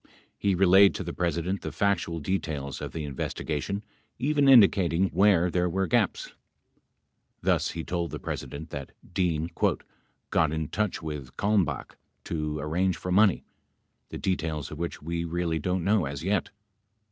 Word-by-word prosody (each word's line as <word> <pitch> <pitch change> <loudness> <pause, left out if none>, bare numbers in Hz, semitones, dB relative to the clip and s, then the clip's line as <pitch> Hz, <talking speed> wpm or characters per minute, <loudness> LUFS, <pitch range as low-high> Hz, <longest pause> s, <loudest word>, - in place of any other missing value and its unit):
He 100 -2 +1
relayed 95 +2 +6
to - - -3
the 85 -1 -5
President 85 +2 -1
the 80 - -5
factual 85 -1 0
details 75 -5 -3
of - - -5
the 80 - -5
investigation, 75 +7 -3 0.3
even 145 +2 +2
indicating 95 -7 +5
where 95 -3 +4
there 90 0 +1
were 95 +3 0
gaps. 85 - 0 1.1
Thus - - +2
he 80 - -3
told 85 -1 -2
the - - -5
President 80 +3 -6
that 70 -2 -6 0.2
Dean 85 -2 0 0.8
"got 80 -3 +3
in 80 -1 -2
touch 105 -5 -2
with 75 -5 -6
Kalmbaoh 95 -10 0 0.3
to 75 -2 -3
arrange 85 +5 0
for 90 - -5
money, 100 0 +4 0.7
the - - -6
details 80 -5 -2
of 75 - -7
which 85 -3 -4
we 85 +1 -2
really 85 -1 -1
don't 90 +3 -1
know 100 -2 +2
as 70 +2 -5
yet." 95 0 0
85 Hz, 150 wpm, -27 LUFS, 80-95 Hz, 1.1 s, relayed